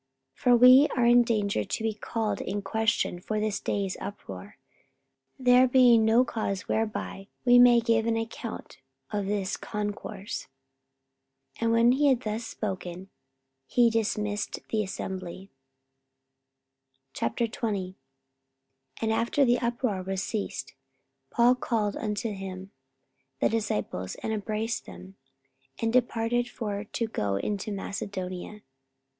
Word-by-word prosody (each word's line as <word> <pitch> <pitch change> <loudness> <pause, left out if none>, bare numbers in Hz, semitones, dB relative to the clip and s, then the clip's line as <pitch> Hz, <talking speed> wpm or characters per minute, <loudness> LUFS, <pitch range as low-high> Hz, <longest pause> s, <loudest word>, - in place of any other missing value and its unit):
44:019:040 - - -27
For 245 -1 +5
we 255 +4 +8
are 240 - +3
in 240 +1 +7
danger 210 - 0
to 220 - -4
be 220 -1 0
called 220 +1 -3
in 205 0 -3
question 220 -2 0
for 215 +4 -3
this 215 -1 -1
day's 195 -2 -2
uproar, 205 - -8 0.8
there 255 -1 +5
being 245 -3 +6
no 225 +3 +4
cause 200 -5 -2
whereby 215 -3 -2 0.2
we 245 0 +7
may 245 -1 +7
give 230 -1 +1
an 225 0 +1
account 225 0 -6 0.3
of 205 -2 -2
this 200 -2 -1
concourse. 205 -1 -5 1.1
44:019:041 - - -13
And 230 0 +2
when 230 +1 +5
he 285 +3 +3
had 260 -3 +3
thus 220 0 -3
spoken, 190 -2 -5 0.6
he 240 - +4
dismissed 210 -2 -2
the 220 - +1
assembly. 190 -1 -6 1.6
44:020:001 210 - -2 1.1
And 220 0 +2
after 235 +5 +2
the 245 0 +3
uproar 235 -4 -1
was 190 +1 -3
ceased, 215 -3 -4 0.6
Paul 240 +1 +4
called 220 -5 -1
unto 215 +1 -2
him 190 -1 -7 0.7
the - - +3
disciples, 105 - -2
and 220 - -1
embraced 215 +2 -3
them, 90 +1 -11 0.6
and 225 0 0
departed 240 0 +1
for 205 -2 -4
to 230 +2 -2
go 105 - -2
into 205 - -2
Macedonia. 195 0 -5
220 Hz, 125 wpm, -27 LUFS, 195-235 Hz, 1.6 s, we